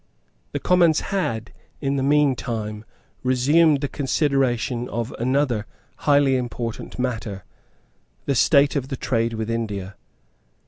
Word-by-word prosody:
The - - -2
Commons 175 -3 +4
had, 115 - -2 0.3
in 140 -1 -1
the 135 - 0
meantime, 125 -7 0 0.4
resumed 140 +4 +3
the 145 - 0
consideration 135 -4 0
of 115 +1 -3
another 125 -3 0 0.3
highly 140 -2 +3
important 120 -2 -5
matter, 110 -6 -3 0.8
the 140 - +1
state 140 +3 +4
of 135 -2 -1
the 135 -1 -4
trade 115 -2 0
with 110 0 -3
India. 100 -4 -3
130 Hz, 120 wpm, -23 LUFS, 115-140 Hz, 0.8 s, Commons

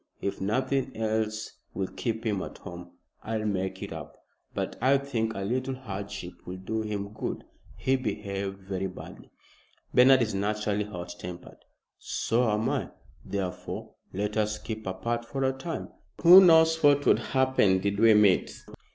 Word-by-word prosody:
If 100 - -3
nothing 130 +5 -1
else 110 0 -2 0.2
will 95 - -1
keep 115 +3 -4
him 105 -4 0
at - - -7
home, 90 0 -10 0.3
I'll 110 -1 -3
make 95 -2 -2
it - - -6
up. - - -9 0.4
But - - -2
I 135 +2 +5
think 115 -5 -2
a 100 - -4
little 130 +6 -1
hardship 100 -6 -6
will 90 +1 -5
do 110 +4 -3
him 105 -1 -4
good. - - -4 0.3
He 135 0 +1
behaved 100 -5 -4
very 95 0 -3
badly." 90 - -11 0.6
"Bernard 130 0 +7
is 110 - -2
naturally 105 +1 -1
hot 90 -4 -7
tempered." 90 0 -9 0.4
"So 115 +1 0
am 105 +2 +1
I. 135 -10 -1 0.3
Therefore, 95 -3 -5 0.2
let 105 +3 -2
us 105 0 +1
keep 110 -1 -6
apart 115 +6 -2
for 135 +3 -3
a 130 0 +2
time. 160 +5 -5 0.3
Who 180 +3 +11
knows 160 -2 +6
what 145 -1 +5
would - - +5
happen 130 -8 +2
did 100 +1 -1
we 110 -1 +7
meet. 105 -3 +3
110 Hz, 160 wpm, -28 LUFS, 100-130 Hz, 0.6 s, Who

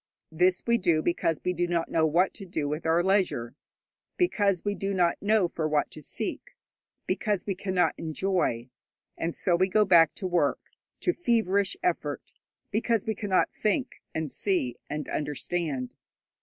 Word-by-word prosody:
This 180 +3 +2
we 235 0 +3
do 170 -4 +2
because 165 -2 0
we 180 - +1
do 175 0 0
not 170 -1 0
know 160 -1 +3
what 175 +5 +2
to - - -8
do 160 -6 -3
with 150 +3 -3
our 165 +2 +3
leisure, 185 - +1 0.6
because 205 - +1
we 205 - +1
do 195 -1 -3
not 175 -2 +1
know 210 -2 +3
for 160 -2 -2
what 150 -1 0
to 155 - -8
seek, - - -4 0.5
because 200 0 -1
we 200 - -1
cannot 185 -3 +1
enjoy. 160 -8 -1 0.4
And 165 0 -3
so 175 - +1
we 185 +2 +3
go 210 +2 +4
back 170 -4 +5
to 190 - -5
work, 175 -6 0 0.3
to 355 - +2
feverish 210 - +1
effort, 360 - -2 0.4
because 225 0 +1
we 220 - 0
cannot 200 -4 0
think, 225 +5 -1
and 160 -3 -3
see, 175 - +1
and 150 0 -4
understand. 150 -3 -2
180 Hz, 165 wpm, -27 LUFS, 160-200 Hz, 0.6 s, back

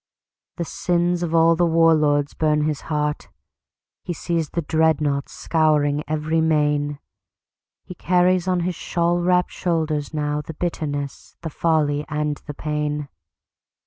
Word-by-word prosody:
The 170 - -2
sins 175 +1 0
of 165 -1 -1
all 165 0 +5
the 175 - +1
war 165 0 +5
lords 145 -2 +1
burn 150 -1 +1
his 150 -2 -1
heart. 150 -1 -2 0.7
He 175 - -3
sees 165 -1 -2
the 170 - -3
dreadnaughts 150 -2 +1
scouring 150 -2 +1
every 155 +1 0
main. 150 -2 +1 0.9
He - - -9
carries 180 +1 +2
on 180 -1 +1
his 180 +1 -1
shawl 170 +1 0
wrapped 180 0 +2
shoulders 160 -4 -1
nowThe 150 0 -3
bitterness, 145 -5 -4
the 165 -2 -5
folly 150 -3 +1
and 150 0 -1
the 145 - -6
pain. 150 -1 -3
155 Hz, 135 wpm, -22 LUFS, 150-170 Hz, 0.9 s, all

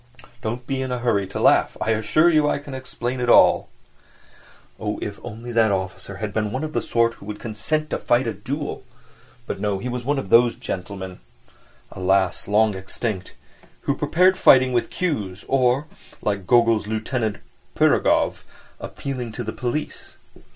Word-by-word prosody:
Don't 120 +2 -4
be 135 +1 -2
in 130 -1 -3
a 125 - -1
hurry 115 -5 0
to 95 - -5
laugh—I 110 - +3
assure 110 +9 +3
you 155 -3 +4
I - - +1
can 140 -1 -9
explain 130 -1 -4
it 120 - 0
all. - - +6 1.1
Oh, - - -3
if 100 - -5
only 120 +1 -7
that 115 -2 +3
officer 95 0 -3
had 105 +2 -4
been 105 -1 -1
one 130 +5 -3
of 155 0 -4
the - - 0
sort 115 0 +1
who 100 - -14
would 105 -1 -6
consent 150 +8 -2
to - - -1
fight 120 +2 +2
a 115 - -1
duel! 140 +9 -5 0.6
But - - -5
no, 100 -1 0
he 110 - -5
was 125 0 -4
one 145 +3 0
of 100 -8 -4
those 120 +2 +5
gentlemen 95 -4 -6 0.7
(alas, 95 0 +1
long 105 +1 +3
extinct!) 95 +1 -5 0.5
who - - 0
preferred 185 +2 +3
fighting 130 -1 +6
with 120 - +1
cues 105 - -3
or, 130 +1 +2 0.4
like 100 -3 -2
Gogol's 115 -3 +4
Lieutenant 110 0 -2 0.4
Pirogov, - - +2 0.4
appealing 125 -4 -5
to 120 - -4
the 110 - -4
police. 125 +5 -4
115 Hz, 165 wpm, -23 LUFS, 105-130 Hz, 1.1 s, all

